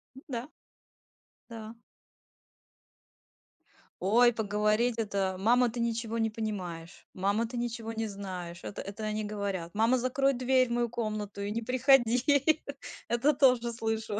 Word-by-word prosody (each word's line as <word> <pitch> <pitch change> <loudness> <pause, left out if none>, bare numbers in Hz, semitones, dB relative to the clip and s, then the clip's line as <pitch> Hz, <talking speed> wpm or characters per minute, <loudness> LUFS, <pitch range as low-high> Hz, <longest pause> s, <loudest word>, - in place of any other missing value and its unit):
М, 265 - -11
да. 245 0 -4 1.0
Да. 225 0 -8 2.3
Ой, 235 +6 +5
поговорить 215 +2 +1
это: 195 -3 -1
"Мама, 240 +4 +4
ты 240 - -6
ничего 230 -1 -1
не 225 0 +2
понимаешь. 185 -6 -6
Мама, 200 +5 0
ты 245 - -6
ничего 230 -1 -3
не 225 0 -2
знаешь". 185 -4 -7
Это - - -6
это 200 +2 -7
они 215 0 -2
говорят: 200 -5 -3
"Мама, 225 +4 +3
закрой 270 +2 +1
дверь 255 +1 +2
в - - -7
мою 240 0 +1
комнату 215 -3 -4
и 200 +1 -3
не 230 +2 -2
приходи". 260 +3 +4 0.5
Это 255 +6 +2
тоже 250 -3 +3
слышу. 220 -2 -2
225 Hz, 135 wpm, -30 LUFS, 205-240 Hz, 2.3 s, Ой